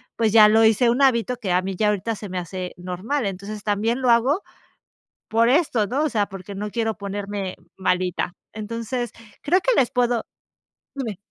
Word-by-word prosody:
pues, 220 Hz, -2 st, +1 dB
ya 215 Hz, -1 st, +8 dB
lo 220 Hz, +1 st, +5 dB
hice 225 Hz, +2 st, +4 dB
un 250 Hz, +4 st, +2 dB
hábito 250 Hz, -1 st, +3 dB
que 190 Hz, -, -3 dB
a 180 Hz, +1 st, +3 dB
mí 190 Hz, 0 st, -3 dB
ya 210 Hz, +3 st, +2 dB
ahorita 210 Hz, +2 st, -1 dB
se 205 Hz, -1 st, -8 dB
me 185 Hz, -, -3 dB
hace 180 Hz, +1 st, -6 dB
normal, 185 Hz, +10 st, -3 dB
entonces, 200 Hz, +2 st, -6 dB
también 215 Hz, +5 st, 0 dB
lo 255 Hz, -, +2 dB
hago 265 Hz, -, +3 dB, 0.9 s
por 230 Hz, +1 st, +3 dB
esto, 255 Hz, -8 st, +2 dB
¿no?, 275 Hz, +7 st, 0 dB
o -, -, +2 dB
sea, 210 Hz, -3 st, +1 dB
porque 195 Hz, +1 st, -9 dB
no 210 Hz, +2 st, -4 dB
quiero 225 Hz, -1 st, -1 dB
ponerme 200 Hz, -1 st, -4 dB, 0.2 s
malita, 180 Hz, -1 st, 0 dB, 0.2 s
entonces, 230 Hz, +2 st, -4 dB, 0.3 s
creo 360 Hz, +6 st, +3 dB
que -, -, +2 dB
les 245 Hz, -, +1 dB
puedo 245 Hz, -2 st, +1 dB, 0.7 s
Dime. 230 Hz, -9 st, -4 dB
215 Hz, 185 wpm, -23 LUFS, 195-240 Hz, 0.9 s, ya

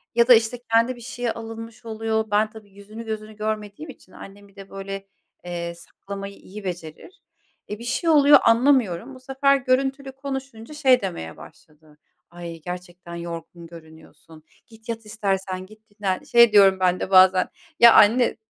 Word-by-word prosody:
Ya 235 Hz, 0 st, +4 dB
da, 250 Hz, -, +9 dB
işte, 225 Hz, +1 st, +2 dB, 0.2 s
kendi 230 Hz, +3 st, +3 dB
bir 240 Hz, -, -14 dB
şeye 245 Hz, 0 st, -4 dB
alınmış 225 Hz, +1 st, -9 dB
oluyor. 220 Hz, 0 st, -2 dB
Ben 210 Hz, +1 st, +2 dB
tabii 215 Hz, -1 st, -15 dB
yüzünü, 210 Hz, +3 st, -11 dB
gözünü 215 Hz, -1 st, -6 dB
görmediğim 215 Hz, +6 st, -5 dB
için 215 Hz, -8 st, -15 dB
annem 200 Hz, +1 st, -13 dB
bir 200 Hz, -, -25 dB
de 195 Hz, -1 st, -12 dB
böyle, 195 Hz, 0 st, -7 dB, 0.4 s
eee, 170 Hz, -1 st, -5 dB
saklamayı 200 Hz, +3 st, -9 dB
iyi 205 Hz, +2 st, -12 dB
becerir. 175 Hz, -, -8 dB, 0.5 s
E, 210 Hz, -, -6 dB
bir -, -, -9 dB
şey 290 Hz, +8 st, -1 dB
oluyor 290 Hz, -2 st, +7 dB
anlamıyorum. 235 Hz, -2 st, +2 dB
Bu -, -, -13 dB
sefer 270 Hz, +2 st, +1 dB
görüntülü 270 Hz, +1 st, -1 dB
konuşunca 270 Hz, -2 st, -7 dB
şey 265 Hz, -4 st, +3 dB
demeye 80 Hz, -, -6 dB
başladı: 155 Hz, 0 st, -18 dB, 0.3 s
"Ay, 170 Hz, -1 st, -9 dB
gerçekten 180 Hz, 0 st, -9 dB
yorgun 170 Hz, 0 st, -8 dB
görünüyorsun. 160 Hz, -1 st, -16 dB, 0.2 s
Git, 225 Hz, 0 st, -18 dB
yat 230 Hz, -1 st, -5 dB
istersen, 195 Hz, -3 st, -3 dB
git 215 Hz, +2 st, -18 dB
dinlen." 205 Hz, -3 st, -3 dB
Şey 235 Hz, -1 st, +5 dB
diyoryum 195 Hz, -2 st, +5 dB
ben 185 Hz, -1 st, +1 dB
de -, -, -4 dB
bazen, 185 Hz, 0 st, +5 dB, 0.3 s
"Ya, 235 Hz, -1 st, +9 dB
anne 235 Hz, +4 st, +4 dB
215 Hz, 160 wpm, -23 LUFS, 185-235 Hz, 0.5 s, da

